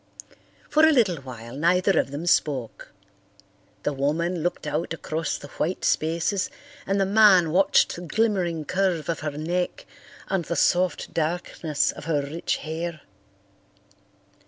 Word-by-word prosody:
For 310 +1 +3
a 315 - +7
little 220 - +3
while 120 -3 -9
neither 180 +4 +3
of - - 0
them 145 +4 -5
spoke. 140 -8 0 0.9
The 145 - 0
woman 160 +6 -1
looked 175 +2 -2
out 165 - -2
across 160 0 -3
the 145 - -11
white 180 +4 -1
spaces 170 +5 0 0.4
and 195 +1 +1
the 195 - +3
man 195 -5 +5
watched 190 +4 +3
the 175 - -7
glimmering 180 -4 0
curve 180 -2 0
of 165 - -1
her 150 -1 -4
neck 180 - -2 0.4
and 190 -3 0
the 170 +2 -3
soft 180 +3 +1
darkness 160 -2 -1
of - - -11
her 150 -3 0
rich 155 +4 -2
hair. 160 0 -4
170 Hz, 140 wpm, -25 LUFS, 155-185 Hz, 0.9 s, a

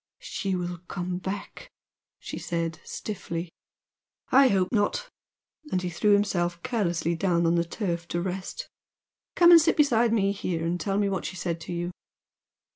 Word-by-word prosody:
"She 195 -1 -3
will 175 -1 -3
come 180 0 -3
back," 195 - -6 0.5
she - - -7
said 165 -2 -3
stiffly. 170 -5 -5 0.8
"I 270 0 +7
hope 190 -5 +2
not!" 230 - 0 0.6
And 185 - +2
he 180 - -2
threw 205 +5 +3
himself 175 -4 +1
carelessly 175 -8 0
down 170 -1 +1
on 165 - +3
the 170 0 +3
turf 170 -1 -3
to 175 - -2
rest 190 - -4 0.7
"Come 345 0 +7
and 335 -1 +10
sit 325 - +2
beside 240 -6 +4
me 200 -3 +2
here 175 -4 -2
and 175 +1 -1
tell 195 +1 -1
me 205 -1 +2
what 190 -2 -2
she - - -4
said 170 -2 -3
to 165 - -7
you!" 175 +1 -3
185 Hz, 165 wpm, -27 LUFS, 170-205 Hz, 0.8 s, and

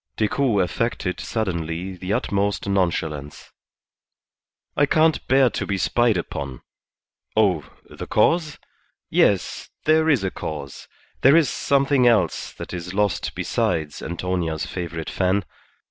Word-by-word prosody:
Decoud 110 -1 +1
affected 90 -1 -2
suddenly 90 -3 -3
the 90 +2 -5
utmost 100 -2 0
nonchalance. 80 -6 -2 1.2
"I 145 - +3
can't 160 +1 +2
bear 130 -2 +4
to - - -3
be 100 - -1
spied 120 +2 +2
upon. 70 -6 -5 0.8
Oh, 90 -9 +2 0.2
the - - -8
cause? 165 -3 +2 0.5
Yes, 100 -3 +1 0.2
there 160 +1 +4
is 135 -10 +3
a 95 - -1
cause; 70 -3 -7 0.3
there 135 +4 +7
is 165 -4 +4
something 140 -2 +2
else 105 -8 +2
that - - -8
is 90 +1 -6
lost 105 -1 0
besides 75 -3 -1
Antonia's 85 -2 -2
favourite 85 -3 -5
fan. 95 +1 +1
95 Hz, 120 wpm, -23 LUFS, 85-120 Hz, 1.2 s, there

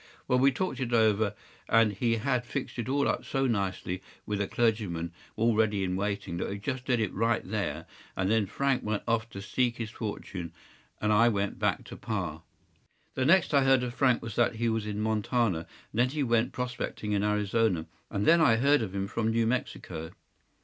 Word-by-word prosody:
’ - - -29
Well, 125 - +3
we 135 +2 +5
talked 185 +4 -2
it 125 -2 -2
over, 110 -2 +3 0.3
and 115 -2 +4
he 115 +3 +1
had 120 +2 0
fixed 130 0 -5
it 120 - -3
all 140 +1 +2
up - - 0
so 135 -1 0
nicely, 95 -5 -1 0.2
with 105 -1 -2
a 100 - 0
clergyman 100 -8 0 0.2
all 115 +1 +2
ready 105 -2 +2
in 90 -1 -1
waiting, 100 -2 -2
that - - -2
we 100 - -4
just 130 +5 -4
did 125 -3 +2
it 105 -4 -1
right 115 +2 0
there; - - -2 0.3
and 95 +1 +1
then 110 -3 +2
Frank 135 +4 0
went 105 -1 -2
off 115 -1 0
to 100 -2 -8
seek 120 +4 0
his 115 -1 -4
fortune, 95 -7 -5 0.5
and 105 0 +2
I 115 +3 +6
went 100 -2 -1
back - - +1
to - - -9
pa. - - -4 0.7
“The 130 - 0
next 170 +2 +4
I 140 -1 +5
heard 135 -1 +4
of 120 -1 -3
Frank 125 -2 +2
was 115 -3 -6
that 120 -1 +3
he 115 +1 0
was 110 -1 -1
in 105 0 -3
Montana, 110 -4 0 0.2
and 110 - -3
then 125 +1 +4
he 145 +1 -1
went 115 -2 +2
prospecting 125 -4 -4
in 100 -1 +2
Arizona, 105 -3 +1 0.2
and 100 +1 -1
then 170 0 +6
I 115 -8 +6
heard 140 +4 +4
of 100 -3 -4
him 95 0 -1
from 110 +3 -1
New 115 0 +2
Mexico. 90 -9 -3
110 Hz, 210 wpm, -29 LUFS, 100-125 Hz, 0.7 s, I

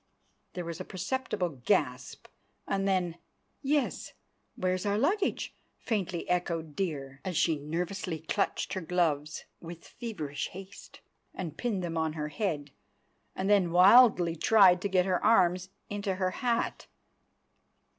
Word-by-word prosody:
_" - - -45
There 180 -2 -5
was 170 -1 -5
a - - -3
perceptible 185 - -3
gasp—and 195 +8 -2
then, 180 -3 0 0.4
"Yes; 285 0 -1 0.4
where's 185 0 -1
our 205 0 +1
luggage?" 380 - 0 0.2
faintly 190 -6 -2
echoed 165 -4 -1
Dear, 140 -7 -4
as 185 -4 -3
she 160 -2 +2
nervously 170 +3 -3
clutched 165 +6 -2
her 190 - -2
gloves 160 -4 -1
with 170 0 -10
feverish 175 - -5
haste 195 +1 -12 0.3
and 165 -5 -5
pinned 210 -5 -2
them 165 -1 -2
on 160 -1 0
her 150 -1 -4
head, 150 -4 -3 0.6
and 190 - -2
then 200 -4 +4
wildly 185 -2 +6
tried 185 -1 +5
to 200 - -1
get 185 -1 +3
her 185 -2 0
arms 180 -4 +3 0.2
into 200 -2 -2
her 185 0 0
hat. 235 +2 -1
180 Hz, 135 wpm, -29 LUFS, 165-200 Hz, 0.6 s, wildly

